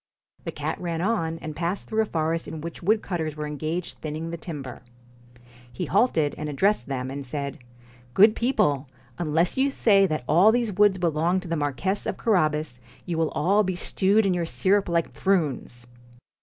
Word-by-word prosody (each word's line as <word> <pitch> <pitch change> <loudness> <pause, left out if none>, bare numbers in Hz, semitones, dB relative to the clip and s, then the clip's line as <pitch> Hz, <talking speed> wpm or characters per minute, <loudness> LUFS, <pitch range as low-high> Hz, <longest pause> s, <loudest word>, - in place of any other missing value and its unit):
The - - -3
cat - - -4
ran 170 -2 -2
on, 170 -4 0
and 155 -1 -5
passed 175 +4 -3
through 220 0 +1
a 220 - -1
forest 165 -1 -1
in 160 - -6
which 170 +1 -7
woodcutters 175 -6 0
were 150 0 -4
engaged 155 +4 -4
thinning 155 +2 -5
the - - -3
timber. 150 -6 -7 0.9
He 120 - -4
halted, 175 - +2
and 150 0 -3
addressed 170 - +1
them, 130 -1 -3
and 140 +1 -5
said: 140 +1 -5 0.3
' 120 0 -26
Good 215 +2 +7
people! 150 - +1 0.3
unless 170 +4 +1
you 275 +1 +3
say 200 -7 +4
that 155 -6 -2
all 180 +7 +6
these 235 -3 0
woods 205 0 +4
belong 170 +1 +1
to 185 - -10
the 165 - -1
Marquess 150 +7 -1
of - - -2
Carabas, 155 - +1 0.3
you 175 - -3
will 160 -2 +2
all 195 +7 +3
be 185 -2 -2
stewed 200 +4 +2
in 190 - +2
your 175 -2 -1
syrup 195 +2 +1
like 170 -1 0
prunes.' 145 -10 -1
165 Hz, 185 wpm, -25 LUFS, 150-195 Hz, 0.9 s, Good